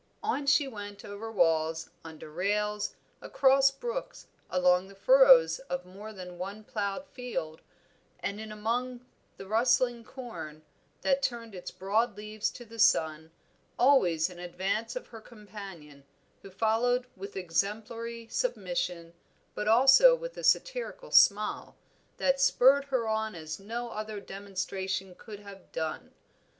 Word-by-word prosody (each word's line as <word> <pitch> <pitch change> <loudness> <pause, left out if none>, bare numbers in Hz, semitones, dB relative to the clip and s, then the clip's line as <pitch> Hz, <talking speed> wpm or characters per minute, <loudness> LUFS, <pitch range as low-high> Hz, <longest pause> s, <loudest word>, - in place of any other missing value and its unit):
On 290 -10 -1
she 285 0 +4
went 205 -4 -8
over 205 +2 -7
walls, 165 -4 +1
under 160 -2 -10
rails, 210 +4 -1 0.3
across 270 0 +4
brooks, 480 - -6 0.2
along 180 0 +3
the 195 - -14
furrows - - +6
of 265 -8 -3
more 200 +4 -10
than 180 -3 -10
one 200 +4 -6
ploughed 210 +5 -3
field, 195 -11 -5 0.6
and 200 +2 -4
in 220 -1 -8
among 240 +4 -3 0.3
the - - -9
rustling 240 +3 +2
corn, 220 - -9 0.4
that 275 0 +2
turned 230 -4 -3
its 180 -2 -7
broad 210 +3 0
leaves 215 0 -3
to 240 - -11
the 230 0 -12
sun, 160 -5 +3 0.5
always 185 - +4
in 180 -2 -11
advance 195 +7 -3
of 255 - -5
her 225 -2 -11
companion, 195 - -11 0.4
who 195 - -11
followed 230 +5 +1
with 195 +1 -9
exemplary 220 +6 -3
submission, 175 - -2 0.4
but 210 - -4
also 270 - +7
with - - -7
a - - -8
satirical - - 0
smile, 210 +1 +4 0.4
that 270 0 +2
spurred 275 +1 +5
her 260 -5 -1
on 220 -2 -1
as 155 -1 -6
no 235 +4 -5
other 215 -1 -5
demonstration 195 -1 -4
could 210 +2 -11
have 200 -2 -13
done. 160 -1 -4
210 Hz, 135 wpm, -29 LUFS, 185-245 Hz, 0.6 s, also